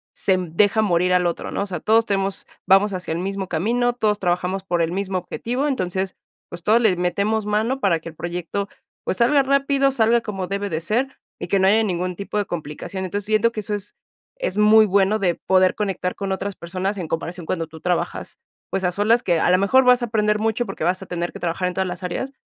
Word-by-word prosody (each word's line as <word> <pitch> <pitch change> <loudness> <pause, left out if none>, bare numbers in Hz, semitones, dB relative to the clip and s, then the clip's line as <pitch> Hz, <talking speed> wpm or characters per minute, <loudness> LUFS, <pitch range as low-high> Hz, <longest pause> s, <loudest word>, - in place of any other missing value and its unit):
se 190 -1 +2
deja 195 +5 +2
morir 180 -3 +2
al 180 -1 +3
otro, 170 - -4
¿no? - - -2
O - - 0
sea, 190 -3 -4
todos 225 +1 +3
tenemos, 195 -2 -1 0.2
vamos 195 +2 +4
hacia 180 -3 -4
el 165 - -1
mismo 195 +1 -3
camino, 235 +9 0
todos 215 -3 +1
trabajamos 180 +1 -1
por 175 -3 0
el 165 0 0
mismo 195 0 -2
objetivo, 245 +9 -3
entonces, 190 -7 -2 0.3
pues, 170 0 -9
todos 220 +5 +4
les 215 -6 +4
metemos 200 +5 0
mano 220 +6 0
para 175 -6 +2
que 165 - -8
el 160 - -14
proyecto, 175 +4 -4 0.3
pues - - -2
salga 275 +4 +4
rápido, 275 0 +2
salga 235 -2 +3
como 195 -4 -4
debe 200 +1 -3
de 160 -3 -2
ser 240 +10 -1 0.2
y - - -5
que 195 - +2
no 190 - +4
haya 220 +3 +4
ningún 180 -2 -2
tipo 200 +3 -5
de 205 - +1
complicación. 175 +3 -5
Entonces, 200 +2 -3
siento 215 +2 +2
que 225 - -5
eso 210 +1 -4
es 205 0 -5 0.5
es - - -2
muy 215 +1 +6
bueno 200 +1 +2
de 180 -4 +1
poder 185 -1 +2
conectar 195 -3 -2
con 195 -1 -4
otras 195 +1 -3
personas 185 +4 -3
en 170 -4 -5
comparación 170 +2 -4
cuando 165 -1 -2
tú 160 0 -13
trabajas, 180 -1 -2 0.3
pues, 190 -1 -1
a 180 - +2
solas 220 +5 +3
que, 175 -6 +1
a - - +3
lo 180 - +5
mejor, 200 +8 +4
vas 250 0 +5
a - - 0
aprender 210 -2 +1
mucho, 225 +2 0
porque 195 -6 -4
vas 185 +2 +1
a 190 - -9
tener 175 -1 -3
que - - -8
trabajar 175 +1 -1
en 180 - -3
todas 190 +1 -1
las 180 +1 -7
áreas, 220 +9 -3
195 Hz, 235 wpm, -22 LUFS, 180-215 Hz, 0.5 s, muy